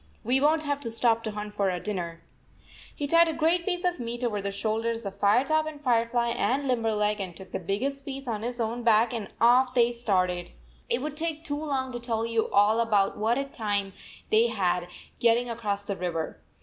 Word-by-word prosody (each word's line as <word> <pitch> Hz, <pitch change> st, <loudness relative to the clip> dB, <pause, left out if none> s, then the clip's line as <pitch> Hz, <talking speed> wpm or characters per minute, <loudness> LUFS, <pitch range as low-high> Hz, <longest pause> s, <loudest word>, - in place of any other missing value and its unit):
We 255 Hz, +3 st, +2 dB
won 310 Hz, +2 st, +4 dB
t -, -, -6 dB
have 285 Hz, -1 st, -1 dB
to 235 Hz, -, -4 dB
stop 230 Hz, 0 st, +2 dB
to -, -, -1 dB
hunt 210 Hz, 0 st, -6 dB
for 200 Hz, -2 st, +1 dB
our 180 Hz, -1 st, -2 dB
dinner." 175 Hz, -4 st, -4 dB, 0.7 s
He 290 Hz, -, -2 dB
tied 335 Hz, +3 st, +5 dB
a 325 Hz, -, -1 dB
great 335 Hz, +3 st, +2 dB
piece 355 Hz, -2 st, -1 dB
of 355 Hz, -3 st, 0 dB
meat 240 Hz, +1 st, -4 dB
over 210 Hz, -4 st, -1 dB
the 200 Hz, -, -2 dB
shoulders 225 Hz, +2 st, -2 dB
of 195 Hz, -, -6 dB
Firetop 275 Hz, +10 st, +3 dB
and 305 Hz, -2 st, -7 dB
Firefly 235 Hz, -3 st, +1 dB
and 270 Hz, +4 st, 0 dB
Lim 250 Hz, -2 st, +1 dB
berleg, 210 Hz, -1 st, +1 dB
and 185 Hz, -3 st, -5 dB
took 190 Hz, -1 st, -11 dB
the -, -, -3 dB
biggest 260 Hz, +10 st, -2 dB
piece 275 Hz, -1 st, -6 dB
on 220 Hz, -3 st, -2 dB
his 240 Hz, +2 st, -4 dB
own 230 Hz, +1 st, -2 dB
back, 230 Hz, 0 st, +4 dB
and 225 Hz, -4 st, -4 dB
off 250 Hz, +2 st, +4 dB
they 240 Hz, -1 st, +4 dB
started. 185 Hz, -7 st, 0 dB
III -, -, -21 dB, 0.4 s
It 240 Hz, -, +1 dB
would 300 Hz, -1 st, -4 dB
take 320 Hz, 0 st, -3 dB
too 290 Hz, +1 st, -3 dB
long 265 Hz, -3 st, -1 dB
to 240 Hz, -, -5 dB
tell 230 Hz, -2 st, -1 dB
you 230 Hz, -1 st, 0 dB
all 210 Hz, +3 st, +4 dB
about 210 Hz, -4 st, +2 dB
what 225 Hz, +3 st, +2 dB
a 275 Hz, -, -1 dB
time 205 Hz, -7 st, -2 dB, 0.4 s
they 225 Hz, +2 st, +5 dB
had 180 Hz, -5 st, 0 dB, 0.3 s
getting 235 Hz, +1 st, +3 dB
across 205 Hz, -3 st, -2 dB
the 200 Hz, -1 st, -3 dB
river. 165 Hz, -, -4 dB
230 Hz, 220 wpm, -27 LUFS, 205-265 Hz, 0.7 s, tied